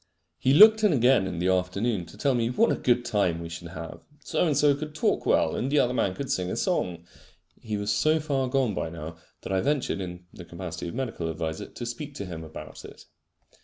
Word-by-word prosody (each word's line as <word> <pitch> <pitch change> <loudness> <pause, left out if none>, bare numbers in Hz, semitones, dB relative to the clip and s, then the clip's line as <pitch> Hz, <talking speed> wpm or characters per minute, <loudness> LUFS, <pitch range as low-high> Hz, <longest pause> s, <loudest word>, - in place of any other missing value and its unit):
He 135 +2 +3
looked 220 +4 +8
in 210 - +5
again 125 -7 +4
in 90 -3 -4
the 90 +2 0
afternoon 95 +1 0
to 85 - -14
tell 140 -2 +1
me 115 -2 +1
what 225 - +3
a - - +2
good 120 -1 +1
time 90 -6 +1
we 85 0 -6
should 85 +1 -7
have. 85 0 -8 0.2
So - - 0
and 150 -4 +1
so 145 0 +5
could 150 +1 -7
talk 155 - 0
well, 80 - +3
and 135 - -2
the 150 - +2
other 125 -3 +3
man 95 -6 0
could 140 - -4
sing 90 -1 -1
a - - -2
song. 90 - -1 0.6
He 110 -2 -3
was 100 0 -1
so 155 +1 +2
far 140 -4 -1
gone 130 -4 +1
by 80 - -3
now, 80 0 -8 0.3
that - - -4
I 95 - +2
ventured 140 -7 0
(in 90 -1 -7
the 90 - -10
capacity 85 -1 -6
of 85 - -6
medical 115 -10 -3
adviser) 80 0 -4
to 120 - -8
speak 140 +5 -6
to 100 - -5
him 85 -3 -7
about 80 -1 -10
it. - - -12
105 Hz, 235 wpm, -26 LUFS, 85-135 Hz, 0.6 s, looked